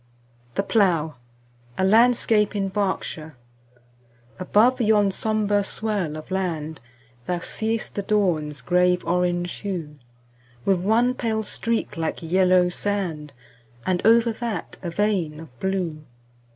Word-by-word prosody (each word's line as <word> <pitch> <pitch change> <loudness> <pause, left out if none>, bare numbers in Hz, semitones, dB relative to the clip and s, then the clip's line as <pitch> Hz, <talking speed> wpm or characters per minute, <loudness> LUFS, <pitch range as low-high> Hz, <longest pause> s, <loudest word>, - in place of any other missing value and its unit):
The - - +1
Plough 170 - +1 0.6
A 190 - +2
LANDSCAPE 220 0 +4
IN 195 -1 0
BERKSHIRE 190 -6 -3 1.0
ABOVE 225 +7 +3
yon 210 -3 +3
sombre 210 0 0
swell 195 -7 -2
of 155 - -10
land 160 -5 -2 0.5
Thou 180 - 0
see'st 220 +5 -2
the 200 - -2
dawn's 165 -9 0
grave 180 +6 +2
orange 175 0 0
hue, 165 -7 -5 0.7
With 190 -2 +3
one 225 +7 +2
pale 220 -3 -1
streak 225 -1 -2
like 165 0 -3
yellow 180 +1 +4
sand, 180 -6 -3 0.5
And 180 -1 0
over 230 +1 +5
that 225 -6 -5
a 175 - -4
vein 175 -5 0
of 140 -7 -13
blue. 180 -5 -2
190 Hz, 120 wpm, -24 LUFS, 170-215 Hz, 1.0 s, over